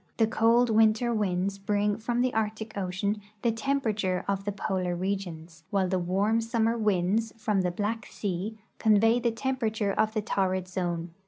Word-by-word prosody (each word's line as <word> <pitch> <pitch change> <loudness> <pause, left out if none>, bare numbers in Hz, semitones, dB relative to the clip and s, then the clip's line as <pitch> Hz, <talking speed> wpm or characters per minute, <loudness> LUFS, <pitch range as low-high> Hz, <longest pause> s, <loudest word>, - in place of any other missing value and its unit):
The 225 - +4
cold 230 +2 +3
winter 220 +2 +4
winds 195 -2 -1
bring 205 +1 +1
from 240 +2 0
the 255 0 +1
Arctic 220 0 -2
ocean 200 +2 -2 0.2
the 235 - +3
temperature 220 -7 -1
of 195 0 -1
the 205 - 0
polar 185 -3 -2
regions, 175 -4 -4
while 195 -2 +1
the 185 0 0
warm 200 +6 +1
summer 230 0 +1
winds 210 +1 +1
from 210 -3 +1
the 180 - +1
Black 210 +5 -3
sea 200 +2 -3 0.2
convey 225 +2 +4
the 240 - +1
temperature 225 -4 -1
of 215 +3 0
the 215 - +1
torrid 185 -3 0
zone. 175 -2 -3
210 Hz, 165 wpm, -28 LUFS, 185-225 Hz, 0.2 s, The